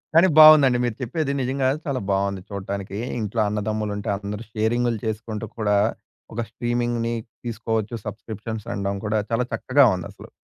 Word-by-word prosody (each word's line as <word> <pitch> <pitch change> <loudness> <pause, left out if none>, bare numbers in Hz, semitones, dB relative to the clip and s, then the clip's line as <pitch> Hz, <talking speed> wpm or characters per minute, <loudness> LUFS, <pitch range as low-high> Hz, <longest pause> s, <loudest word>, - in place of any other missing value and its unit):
కాని 170 +3 +7
బాగుందండి, 150 -5 +9
మీరు 120 -2 -1
చెప్పేది. 140 +3 -1
నిజంగా 130 +1 0 0.2
చాలా 135 -3 -1
బావుంది 100 -1 0
చూట్టానికి. 100 0 -5 0.2
ఇంట్లో 110 +1 -2
అన్నదమ్ములుంటే, 105 -1 -2
అందరూ 105 +2 -5
షేరింగులు 115 +1 +1
చేసుకుంటూ 110 0 -4
కూడా, 105 -2 +2 0.6
ఒక 120 - -1
స్ట్రీమింగ్‌ని 120 0 -1 0.3
తీసుకోవచ్చు. 115 -1 -2
సబ్‌స్క్రిప్షన్స్ 110 0 -6
అనడం 100 0 -2
కూడా 105 0 +1
చాలా 120 +2 +1
చక్కగా 135 0 +4
ఉందసలు. 90 - -9
110 Hz, 130 wpm, -23 LUFS, 105-120 Hz, 0.6 s, బాగుందండి